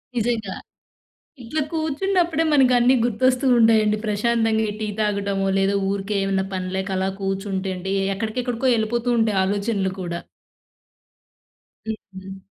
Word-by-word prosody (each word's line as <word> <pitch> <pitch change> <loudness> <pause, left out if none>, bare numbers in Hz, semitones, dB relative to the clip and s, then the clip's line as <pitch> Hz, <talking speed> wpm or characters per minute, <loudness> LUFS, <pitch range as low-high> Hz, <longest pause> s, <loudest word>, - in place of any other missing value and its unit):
నిజంగా. 225 -4 -1 0.9
ఇట్లా 275 +7 -2
కూర్చున్నప్పుడే 330 +2 0
మనకన్నీ 255 -3 +5
గుర్తొస్తూ 250 +3 +1
ఉంటాయండి. 220 -2 +4
ప్రశాంతంగా 220 +1 +1
ఈ - - -4
టీ 215 - -2
తాగడమో 200 -2 0
లేదా 195 +1 +2 0.2
ఊరికే 200 +1 -2
ఏమన్నా 195 -1 0
పనిలేక 190 +1 -3
అలా 190 +1 0
కూర్చుంటే 195 0 -2
అండి 190 +2 -3 0.2
ఎక్కడికెక్కడికో 240 +4 -2
వెళ్ళిపోతూ 235 +2 -1
ఉంటాయి 215 -3 +2
ఆలోచనలు 200 -1 -1
కూడా. 170 -1 -4 1.7
హుహు. 195 -3 -8
215 Hz, 110 wpm, -22 LUFS, 195-240 Hz, 1.7 s, మనకన్నీ